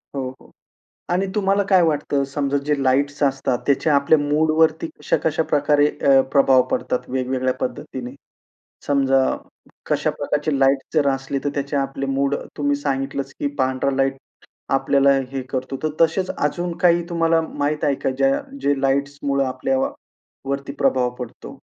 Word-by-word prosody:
हो, 130 -2 -2
हो, - - -19 0.6
आणि 185 +2 +1
तुम्हाला 200 -1 +2
काय 185 -2 +6
वाटतं, 145 -3 +1
समजा 140 0 -1
जे 150 - +2
लाईट्स 140 +2 +1
असतात 135 -3 +1
त्याचा 145 +2 +2
आपल्या 140 +3 +4
मूडवरती 155 +2 +2
कशा 150 - +1
कशा 160 0 +1
प्रकारे 145 0 +3
अ, 140 -2 +3
प्रभाव 135 -2 +5
पडतात 255 -1 -2
वेगवेगळ्या 130 0 -1
पद्धतीने? 125 0 -5 0.7
समजा 135 -2 +3 0.7
कशा - - +1
प्रकारची 150 -1 -1
लाईट 135 0 +4 0.2
जर 150 -3 +3
असली 135 +1 -2
तर 145 - 0
त्याचे 140 0 -3
आपले 135 0 -2
मूड, 135 +1 0 0.2
तुम्ही 145 -1 +1
सांगितलंच 135 -1 -3
की - - 0
पांढरा 130 0 0
लाईट 135 0 +1 0.6
आपल्याला 140 +1 +3 0.2
हे 135 -1 -3
करतो. 130 0 -3
तर 155 - +1
तसेच 175 +3 +2
अजून 175 +4 -1
काही 175 -1 +4
तुम्हाला 165 -1 +2
माहीत 150 -1 -2
आहे 145 -2 +2
का - - +3
ज्या 135 0 +2 0.2
जे 140 -1 +1
लाइट्समुळे 140 0 0
आपल्यावरती 140 - -4
प्रभाव 130 -3 +2
पडतो? 125 -2 -8
140 Hz, 145 wpm, -21 LUFS, 135-150 Hz, 0.7 s, काय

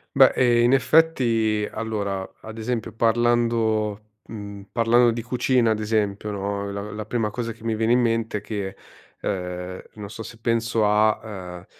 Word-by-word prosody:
Beh, 135 -1 +7
ehm, 120 -2 +4
in 120 - +4
effetti, 125 -7 +3
allora, 100 -4 -3
ad 110 0 -9
esempio 115 0 -3
parlando, 115 -2 +1 0.2
mhmm, 100 -2 -8
parlando 120 +1 +4
di 115 0 -2
cucina 125 -1 +2
ad 110 - 0
esempio, 105 -1 -1
no, 100 0 -3
la 100 +1 -5
la 105 0 -5
prima 110 -2 -1
cosa 115 +1 -3
che 115 0 -13
mi 115 -1 0
viene 110 +2 +2
in 125 - +4
mente 115 -2 0
è - - -6
che, 100 -2 -4 0.5
ehm, 90 -1 -4
non 105 -1 -8
so, 115 - -8
se 115 +1 -9
penso 115 -1 +1
a 105 +1 +3
ehm, 90 -5 -8
110 Hz, 170 wpm, -24 LUFS, 105-115 Hz, 0.5 s, Beh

